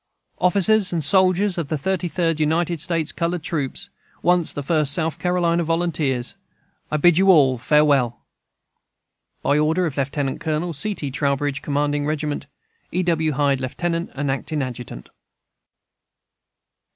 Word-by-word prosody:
Officers 200 +2 +3
and 165 -3 -1
soldiers 185 +4 +3
of 165 - -3
the 155 - -2
Thirty 185 +4 -1
Third 165 -2 -1
United 160 +1 0
States 165 -2 0
Colored 170 -1 -2
Troops, 145 -6 -3 0.3
once 175 -2 +3
the 145 - -5
First 150 -1 +2
South 160 0 -1
Carolina 175 -1 +1
Volunteers, 160 -6 -1 0.5
I 155 - 0
bid 175 +2 +4
you 195 0 +4
all 135 -8 +5
farewell! 140 -4 +3 1.3
By 145 +2 +2
order 160 +4 +2
of 155 -4 -3
Lt. 140 0 -2
Col. 160 +2 -2
C. 200 +8 -2
T. 145 -6 -4
TROWBRIDGE, 140 +1 -1
commanding 145 0 -1
Regiment 150 -2 -3 0.4
E. 180 +2 0
W. 160 -3 +1
HYDE, 140 -1 +1
Lieutenant 170 +6 -2
and 140 0 -1
Acting 145 +2 -2
Adjutant. 120 - -7
155 Hz, 140 wpm, -22 LUFS, 145-175 Hz, 1.3 s, all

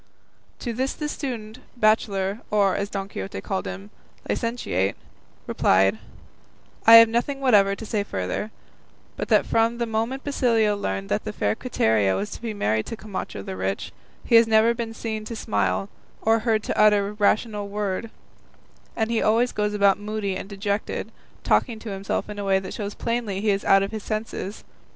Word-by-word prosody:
To 240 - -3
this 260 +4 -1
the 300 - -3
student, 240 -6 -5 0.2
bachelor, 210 -2 +1
or, 200 -2 +3
as 200 0 -2
Don 195 -2 -4
Quixote 95 - -6
called 95 0 -3
him, 95 +2 -7 0.4
licentiate, 105 - -1 0.5
replied, 95 +3 +3 0.9
"I 225 - +11
have 230 0 +10
nothing 240 +5 -1
whatever 205 -7 +4
to 220 - -8
say 210 -1 -1
further, 95 - -3 0.7
but - - -4
that - - +4
from 230 +1 +2
the 235 - -1
moment 230 +4 -2
Basilio 230 -7 +2
learned 95 - -3
that 100 - 0
the - - -4
fair 105 0 0
Quiteria 110 - +1
was 205 - -3
to - - -8
be 230 -2 -3
married 110 - -1
to 230 - -5
Camacho 190 - -6
the 95 - -6
rich, 95 +1 -3 0.3
he - - -2
has 230 0 +6
never 225 +1 +4
been 230 -1 -5
seen 220 -1 -4
to 230 - -6
smile, 100 - -1 0.4
or 225 +1 +4
heard 220 -2 +1
to - - -2
utter 210 -1 +4
rational 210 0 +1
word, 205 +1 -3 0.9
and 220 0 -1
he 230 - +1
always 230 +3 +3
goes 210 0 -1
about 200 -1 +4
moody 205 -2 -3
and 190 +1 -6
dejected, 200 +1 -3 0.3
talking 235 -4 +2
to 220 -1 -7
himself 195 0 -3
in 210 -1 -7
a - - -3
way 195 -1 +3
that 190 -1 -5
shows 205 -2 -5
plainly 230 -5 -2
he 210 +1 +2
is 195 0 -1
out 195 0 +5
of 195 - -3
his 220 -1 -5
senses. 215 -2 -4
210 Hz, 180 wpm, -24 LUFS, 195-225 Hz, 0.9 s, I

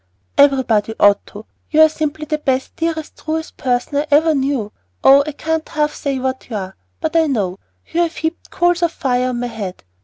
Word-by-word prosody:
"Everybody 250 -6 +3
ought 205 0 +5
to. 210 +2 -11 0.2
You 310 0 +4
are - - +8
simply 310 0 -3
the 305 0 -2
best, 265 -3 -1
dearest, 325 -2 -3
truest 320 +1 -4
person 250 +2 -1
I 300 - -2
ever 315 +2 +4
knew. 265 -6 -1 0.3
Oh, 275 +1 +7
I - - -2
can't 320 +2 -3
half 300 -1 0
say 275 -2 -2
what 260 0 -3
you 225 - -4
are, 190 -2 -5 0.2
but 315 +1 -3
I 325 -1 +4
know! 195 -9 -1 0.3
You 340 - -3
have 335 -1 0
heaped 320 +1 -4
coals 350 0 +1
of 340 -2 +2
fire 255 -4 0
on 245 -1 -3
my 245 - -2
head. 210 -6 -6
280 Hz, 205 wpm, -18 LUFS, 245-315 Hz, 0.3 s, are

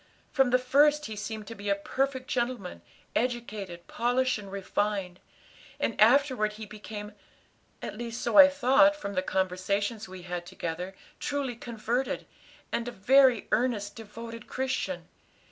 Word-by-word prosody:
From 270 -2 +3
the 250 - +5
first 290 +4 +4
he 220 - -5
seemed 215 +1 -5
to 230 - -7
be 205 -2 -5
a 200 - +4
perfect 260 +5 -2
gentleman, 240 -6 -2 0.3
educated, 215 -7 -2
polished, 250 0 +1
and 200 -2 -10
refined; 195 -1 -2 0.6
and 260 - 0
afterward 245 -2 +4
he 215 +1 -8
became 210 0 -8 0.7
at - - -5
least 235 0 -4
so - - -1
I 290 -2 +11
thought 280 +1 +5
from 200 -9 -5
the 185 - +1
conversations 190 +3 -1
we 185 -1 -9
had 175 -1 -5
together 175 +4 -5 0.2
truly 280 -4 -2
converted, 235 +2 -2 0.5
and 235 - -1
a - - -3
very 255 +3 +4
earnest, 215 -4 0
devoted 230 +1 -9
Christian. 255 -10 -2
225 Hz, 145 wpm, -29 LUFS, 200-255 Hz, 0.7 s, I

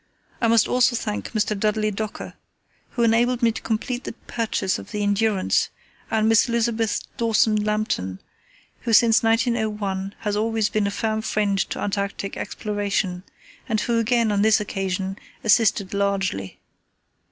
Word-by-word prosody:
I 230 - +3
must 230 -1 +4
also 250 0 +3
thank 105 - -3
Mr. 215 0 0
Dudley 215 +1 0
Docker, 215 +1 -5 0.6
who 240 - 0
enabled 235 +2 +2
me 230 - +5
to - - -7
complete 245 +3 -2
the - - -6
purchase 220 -5 -1
of - - -11
the 210 -1 -2
Endurance, 205 -1 +1 0.4
and 220 0 +2
Miss 225 +2 +4
Elizabeth 230 -2 0 0.2
Dawson 225 -1 +3
Lambton, 210 - -1 0.6
who 230 - -2
since 225 0 +6
1901 215 -4 0
has 210 -2 -1
always 220 0 +1
been 210 -2 0
a - - 0
firm 220 +1 -1
friend 205 -2 0
to - - -4
Antarctic 200 -1 -3
exploration, 205 -3 -2 0.5
and 220 -1 +1
who 235 -1 +1
again, 230 -1 +2
on 200 -1 +1
this 220 0 +5
occasion, 195 -1 -3 0.2
assisted 210 -3 +3
largely. 195 - -1
215 Hz, 145 wpm, -23 LUFS, 200-225 Hz, 0.6 s, since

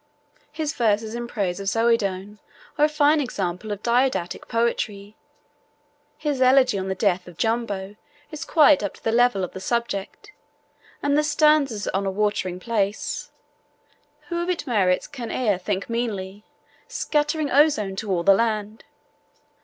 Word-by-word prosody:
His 305 0 -3
verses 220 -1 0
in 240 0 -4
praise 200 -6 -2
of 195 - -6
Zoedone 210 -3 0 0.4
are 300 - +4
a - - +1
fine 300 0 +3
example 195 -5 -3
of 205 0 -5
didactic 245 -6 0
poetry, 215 -3 -2 1.0
his 290 -4 -2
elegy 255 -4 +4
on 190 - -4
the 190 - -2
death 185 -2 0
of 175 -2 -12
Jumbo 210 -3 -2 0.4
is 305 +1 -6
quite 305 -3 +5
up 200 - -4
to - - -20
the 225 - +1
level 240 -4 +3
of 180 - -4
the - - -8
subject, 235 - -3 0.7
and 285 0 +2
the 300 - +3
stanzas 295 -7 +2
on 195 +1 -1
a - - 0
watering 200 -3 -1
place, 205 -1 -2 1.0
Who 345 0 -2
of 345 - -3
its 355 -4 -2
merits 195 -8 +1
can 245 -5 -7
e'er 210 -7 0
think 195 +1 -3
meanly? 210 -4 -4 0.4
Scattering 295 0 -1
ozone 265 -9 +3
to 210 0 -4
all 175 -3 0
the 195 - +6
land! 215 0 -1
225 Hz, 155 wpm, -23 LUFS, 195-270 Hz, 1.0 s, the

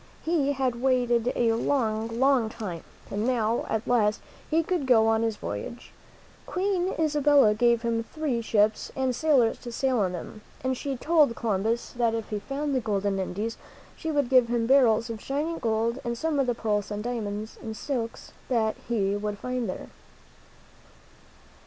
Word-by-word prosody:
He 305 -4 +2
had 255 -3 -1
waited 245 -2 +2
a 230 -1 +2
long, 230 -2 0
long 265 -4 +3
time, 195 -7 -6 0.3
and 205 +1 -1
now, 230 -2 0
at 220 0 -2
last, 215 -4 +2 0.3
he 325 +1 +2
could 320 -5 -1
go 225 -3 +5
on 225 0 +3
his 225 -1 0
voyage. 155 - -6 0.6
Queen 375 -1 0
Isabella 295 -7 +4
gave 235 +1 +2
him 230 -1 0
three 280 -3 -2
ships, 215 -1 +1
and 260 -2 0
sailors 265 -6 +3
to 240 - -8
sail 260 0 +1
them, 180 +4 -7 0.2
and 260 0 0
she 275 0 -4
told 300 -4 +3
Columbus 220 +2 -1
that 235 -2 +1
if 225 -1 -4
he 210 - -1
found 280 +6 -3
the 260 - +2
golden 200 -3 -1
Indies 205 +5 -3 0.4
she 320 - -5
would 290 -4 +1
give 255 -2 +5
him 235 -1 0
barrels 235 -3 +4
of 220 -2 -7
shining 300 +5 -2
gold 230 +2 0
and 235 0 -3
some 315 +1 0
of 270 - +2
the 245 - +1
pearls 210 -3 -1
and 210 0 -4
diamonds 220 -3 -4
and 220 -1 -6
silks 235 -4 -4 0.2
that 225 -4 +1
he 200 -4 +1
would 205 0 -3
find 250 +1 -3
there. - - -6
235 Hz, 170 wpm, -27 LUFS, 220-270 Hz, 0.6 s, go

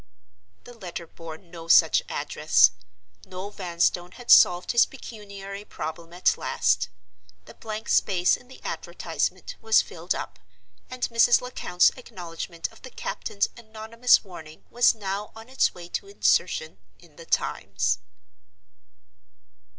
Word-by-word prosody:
The 245 - -12
letter 175 -5 -7
bore 165 -1 -10
no 170 -2 -12
such - - +6
address. - - +3 0.5
Noel 185 +2 -7
Vanstone 175 -1 -1
had 245 0 -3
solved 175 0 +6
his 235 - +5
pecuniary 200 -5 -9
problem 165 -2 -7
at 180 +1 +1
last. 90 +1 +1 0.6
The - - -13
blank 220 0 -7
space 180 -2 +3
in 250 - -15
the 260 - -15
advertisement - - -3
was 220 -1 +4
filled - - -4
up, - - -7 0.5
and 255 -1 -7
Mrs. 230 0 +5
Lecount's 250 -8 +2
acknowledgment 175 -7 -7
of - - -19
the 260 - -10
captain's 200 -4 -2
anonymous 230 +1 +1
warning 160 -6 -12
was 240 0 +4
now 200 0 -4
on 225 +2 -12
its 260 - +1
way 175 -1 -9
to 395 - -4
insertion 485 +4 +1 0.2
in 165 -4 -21
the 165 - -11
Times. 95 -2 0
195 Hz, 130 wpm, -25 LUFS, 170-230 Hz, 0.6 s, such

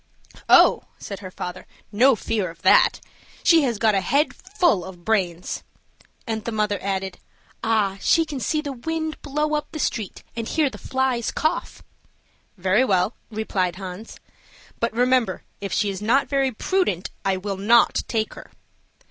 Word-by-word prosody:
"Oh," - - +6
said 200 - -7
her 190 -2 -8
father, 180 0 -7 0.2
"no 250 +5 +5
fear 210 -4 -2
of 165 - -14
that! - - +5 0.4
she 335 -2 +6
has 245 -6 0
got 220 0 +3
a 195 - +2
head 280 - +1
full 350 - +1
of 180 -2 -11
brains;" 185 -6 -1 0.6
and 220 -3 -3
the 235 - -3
mother 210 -2 0
added, 190 -1 -3 0.4
"ah, 210 -4 +1
she 330 -1 +3
can 290 -3 -5
see 305 +4 0
the 290 -2 -5
wind 315 +4 -4
blow 300 +1 -1
up 300 -1 -1
the - - -6
street, 220 -9 -3
and 230 -1 -4
hear 305 -4 +1
the - - -10
flies 260 -3 -1
cough!" 315 +3 -2 0.7
"Very 190 +6 +3
well," 195 -2 +2 0.2
replied 195 -5 -1
Hans; 190 +3 -8 0.6
"but 230 - 0
remember, 245 -4 +1 0.2
if 200 -1 -5
she 205 - +1
is 195 0 -6
not 240 +6 +2
very 275 -1 +1
prudent, 230 - -1
I 195 -1 +1
will 195 +1 -4
not 230 +4 +4
take 220 -2 -1
her." - - -12
220 Hz, 165 wpm, -23 LUFS, 195-270 Hz, 0.7 s, Oh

